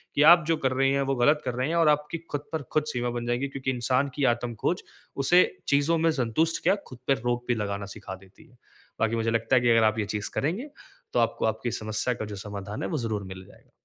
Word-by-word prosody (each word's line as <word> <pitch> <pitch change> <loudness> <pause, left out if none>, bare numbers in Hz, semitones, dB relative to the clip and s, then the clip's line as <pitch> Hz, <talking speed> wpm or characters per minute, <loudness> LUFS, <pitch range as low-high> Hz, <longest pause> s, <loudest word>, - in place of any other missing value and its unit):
कि - - +3
आप 170 -2 +2
जो 165 - +2
कर - - -1
रहे 135 +1 +2
हैं 140 - +1
वो - - +1
ग़लत 145 +5 +3
कर 125 - -1
रहे 125 +2 -1
हैं 165 - -1
और 165 -2 +4
आपकी 150 +2 0
खुद 145 - -2
पर 160 -2 -2
खुद 155 - +2
सीमा 120 0 -1
बन 120 - -4
जाएगी 120 +3 -1
क्योंकि 135 -1 -3
इंसान 130 +2 +1
की 145 - -1
आत्म-खोज 120 - -3 0.4
उसे 175 +5 +7 0.2
चीज़ों 145 +4 +3
में 165 0 +3
संतुष्ट 155 +4 0
क्या - - +4
खुद 125 -2 -12
पर 135 - +3
रोक 120 0 -1
भी 120 - +2
लगाना 100 -2 -3
सिखा 95 - -7
देती 95 0 -19
है। 125 - -24 0.4
बाकी 115 +1 +1
मुझे 115 0 0
लगता 115 +2 +1
है 125 - +5
कि 120 - +2
अगर 115 -1 +5
आप 110 0 +2
ये 105 - 0
चीज़ 105 0 -3
करेंगे 190 - -2 0.4
तो - - +2
आपको 115 - +1
आपकी 110 +2 -1
समस्या 110 +4 -1
का 115 -2 -5
जो 105 -1 -7
समाधान 105 0 -6
है - - -1
वो 160 - -1
ज़रूर 110 -5 -2
मिल 95 0 -9
जाएगा। - - -20
125 Hz, 250 wpm, -26 LUFS, 110-145 Hz, 0.4 s, उसे